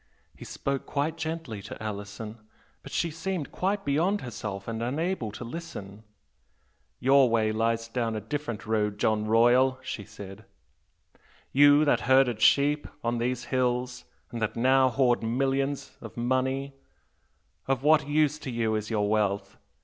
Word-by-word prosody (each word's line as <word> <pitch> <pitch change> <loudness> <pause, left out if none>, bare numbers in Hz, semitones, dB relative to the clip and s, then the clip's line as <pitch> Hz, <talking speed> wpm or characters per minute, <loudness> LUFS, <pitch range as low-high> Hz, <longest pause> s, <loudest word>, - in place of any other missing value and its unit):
He - - -11
spoke 140 -1 -3
quite 150 +3 -1
gently 160 -9 -5
to 115 +7 -9
Alison, 105 +1 -6 0.4
but - - -11
she 170 - 0
seemed 165 -1 -4
quite 195 +2 -1
beyond 170 +9 +1
herself 105 -5 -6
and 115 0 -3
unable 140 - -2
to 125 - -7
listen. 115 - -8 1.0
'Your 135 0 +5
way 110 -1 +2
lies 115 +1 0
down 115 -1 -2
a - - -2
different 120 0 -5
road, 105 -2 0
John 110 0 +1
Royal' 120 +4 +4
she 110 - -5
said 95 +1 -11 1.1
'You 145 +2 +6
that 145 - +3
herded 130 -4 +4
sheep 145 +1 +4 0.2
on 120 0 0
these 125 +1 -1
hills 125 0 0 0.3
and 115 - -5
that 105 - -1
now 130 +2 +4
hoard 125 -1 +2
millions 135 +4 -1
of 115 -1 -10
money 130 +3 0 0.9
of 135 -1 0
what 150 -1 +4
use 150 0 +2
to 140 - -6
you 115 -2 0
is 110 0 -2
your 105 -3 0
wealth? 105 -2 0
125 Hz, 150 wpm, -27 LUFS, 110-140 Hz, 1.1 s, You